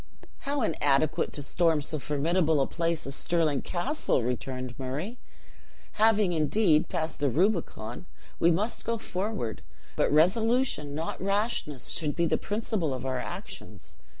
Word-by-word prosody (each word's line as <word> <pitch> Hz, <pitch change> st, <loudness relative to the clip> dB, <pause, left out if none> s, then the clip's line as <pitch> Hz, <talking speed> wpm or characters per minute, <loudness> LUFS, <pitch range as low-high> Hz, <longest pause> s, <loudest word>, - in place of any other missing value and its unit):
"How 285 Hz, -3 st, +1 dB
inadequate 155 Hz, -2 st, +2 dB
to 145 Hz, -, -3 dB
storm 165 Hz, +2 st, +2 dB
so 155 Hz, +1 st, -3 dB
formidable 155 Hz, +3 st, +1 dB
a 135 Hz, -, +3 dB
place 165 Hz, -1 st, -1 dB
as 135 Hz, -, -5 dB
Stirling 155 Hz, -4 st, +1 dB
Castle!" 180 Hz, -, 0 dB
returned 125 Hz, +1 st, -3 dB
Murray. 150 Hz, -, -4 dB, 0.7 s
"Having, 215 Hz, -4 st, +3 dB
indeed, 155 Hz, +1 st, +3 dB
passed 165 Hz, -3 st, -2 dB
the 145 Hz, -, +2 dB
Rubicon, 165 Hz, -, -1 dB, 0.3 s
we 170 Hz, -, +5 dB
must 200 Hz, +7 st, 0 dB
go 230 Hz, 0 st, -1 dB
forward, 195 Hz, -, -3 dB, 0.3 s
but -, -, +2 dB
resolution, 185 Hz, -, +3 dB
not 160 Hz, +2 st, -4 dB
rashness, 200 Hz, -, -1 dB
should 150 Hz, -3 st, -1 dB
be 170 Hz, -, +2 dB
the -, -, +1 dB
principle 205 Hz, -, -1 dB
of 130 Hz, 0 st, -6 dB
our 130 Hz, -1 st, -1 dB
actions. -, -, -8 dB
165 Hz, 140 wpm, -28 LUFS, 145-200 Hz, 0.7 s, we